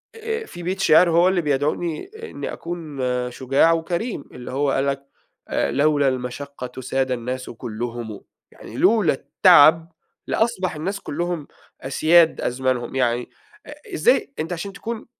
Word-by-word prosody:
آآ 450 0 -4
في 175 - -10
بيت 185 +3 -2
شِعر 175 -1 +5
هو 170 +2 +4
اللي 185 -1 +2
بيدعوني 150 - -1 0.2
إنّي - - -5
أكون 160 -5 -6 0.3
شُجاع 135 +6 +3
وكريم 170 - -2
اللي 125 0 -8
هو 140 +1 0
قال 135 +1 +1
لك: 140 0 -2 0.5
"آآ - - 0
لولا 145 0 +2
المَشقّة 130 0 -6
ساد 130 +1 -1
الناس 125 +1 -3
كُلّهم." 115 -1 -6 0.3
يعني 115 - -11
لولا 200 - +4
التعب 165 +2 +5 0.3
لأصبح 190 -7 0
الناس 190 +6 -3
كُلّهم 170 0 -3 0.3
أسياد 160 +5 +4
أزمانهم. 125 -1 -1
يعني 120 -2 0 0.4
آآ 295 - -9 0.2
إزاي 445 - +2
أنت 160 +3 -2
عشان 195 +3 -5
تكون 225 +2 -6
150 Hz, 140 wpm, -22 LUFS, 130-175 Hz, 0.5 s, شِعر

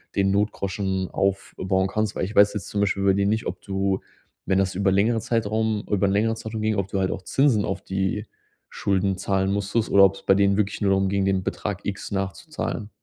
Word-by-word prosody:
den 95 0 +2
Notgroschen 100 -2 -1
aufbauen 95 -1 0
kannst”, 110 +1 -1
weil - - -2
ich 105 - -7
weiß 105 0 +6
jetzt 105 -4 -5
zum 100 - -1
Beispiel 100 -1 0
bei 100 0 +4
dir 100 +1 +1
nicht, 110 +3 0
ob - - -5
du 95 -1 -1 0.5
wenn 95 - +3
das 95 -1 0
über 100 +1 +2
längere 110 +4 +2
Zeitraum 110 -1 -1
über 100 -1 +2
'n - - +1
längere 110 +3 +1
Zeitraum 110 0 -6
ging, 110 0 +1
ob 100 -1 -1
du 100 -1 -2
halt 95 -1 0
auch - - -4
Zinsen 130 -2 +2
auf 95 0 -3
die 95 +2 -2 0.4
Schulden 95 -1 0
zahlen 95 0 0
musstest 100 +3 -1
oder 100 0 +8
ob's 95 0 -1
bei 95 - +5
denen 100 0 +3
wirklich 105 -2 -1
nur 100 -1 +2
darum 95 0 +2
ging, 100 0 0
den 95 -1 +1
Betrag 100 +1 -3
X 100 -1 -4
nachzuzahlen. 100 +3 -4
100 Hz, 215 wpm, -24 LUFS, 95-105 Hz, 0.5 s, oder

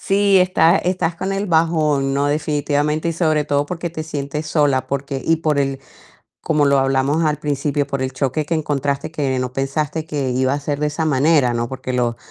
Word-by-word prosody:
Sí, 200 0 +3
está 180 -1 +4
estás 175 -2 -1
con 190 +3 -3
el 195 +1 -2
bajón, 155 -5 +1
¿no?, 140 +1 +1
definitivamente 150 +1 0
y - - 0
sobre 155 -2 +1
todo 145 0 0
porque 170 +1 -4
te 155 -1 -5
sientes 150 0 -4
sola, 145 -4 +1
porque 140 -1 -3
y 165 - +3
por 155 -2 0
el 135 -1 -1 0.6
como 150 -2 +1
lo 140 0 +4
hablamos 135 +4 +1
al 150 -1 +1
principio, 145 -1 -1
por 140 -1 -3
el 130 0 -2
choque 135 +3 -1
que 165 - -2
encontraste 145 -1 -1
que 140 -5 -1
no 125 0 -3
pensaste 150 +3 -2
que 145 -5 -2
iba 130 +1 +1
a 145 - -2
ser 145 0 -3
de 150 - +2
esa 150 +2 -2
manera, 140 -3 +3
¿no?, 120 0 -2
porque 130 -1 -5
lo 120 -2 0
145 Hz, 205 wpm, -19 LUFS, 135-160 Hz, 0.6 s, está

